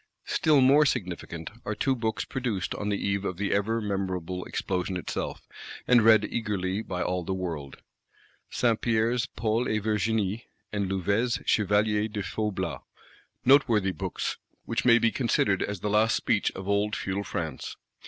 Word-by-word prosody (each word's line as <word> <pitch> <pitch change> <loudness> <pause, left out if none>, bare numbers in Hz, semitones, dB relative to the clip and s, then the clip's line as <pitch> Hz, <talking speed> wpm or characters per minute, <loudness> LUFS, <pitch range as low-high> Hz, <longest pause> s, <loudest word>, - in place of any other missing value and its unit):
Still 150 -3 +3
more 140 +4 +6
significant 85 -6 -3
are 105 - -3
two 135 +4 +1
Books 110 -2 -2
produced 120 -9 -2
on 105 - -3
the 100 - 0
eve 100 0 -1
of 90 -3 -3
the 100 +1 0
ever 105 +3 +1
memorable 95 -3 -3
Explosion 90 0 -2
itself, 90 - -5 0.4
and 125 -1 +6
read 110 -1 +6
eagerly 105 -3 -2
by 90 -5 -3
all 90 -1 -1
the 95 +3 -2
world: 80 -7 -5 0.7
Saint 115 -3 +1
Pierre's 115 +2 +1
Paul 115 +2 -1
et 110 - +1
Virginie, 105 0 0 0.3
and 100 -2 -1
Louvet's 100 +6 0
Chevalier 105 +1 +2
de 105 -2 -4
Faublas. 105 0 -3 0.6
Noteworthy 115 -8 +4
Books; 85 - -3 0.3
which 120 +3 -2
may 120 -2 +7
be 115 -1 +2
considered 105 -6 +1
as 100 -3 -3
the - - -2
last 110 +1 +3
speech - - +1
of 95 0 -7
old 100 +1 +1
Feudal 95 +1 -2
France. 85 - -4
105 Hz, 155 wpm, -27 LUFS, 95-115 Hz, 0.7 s, may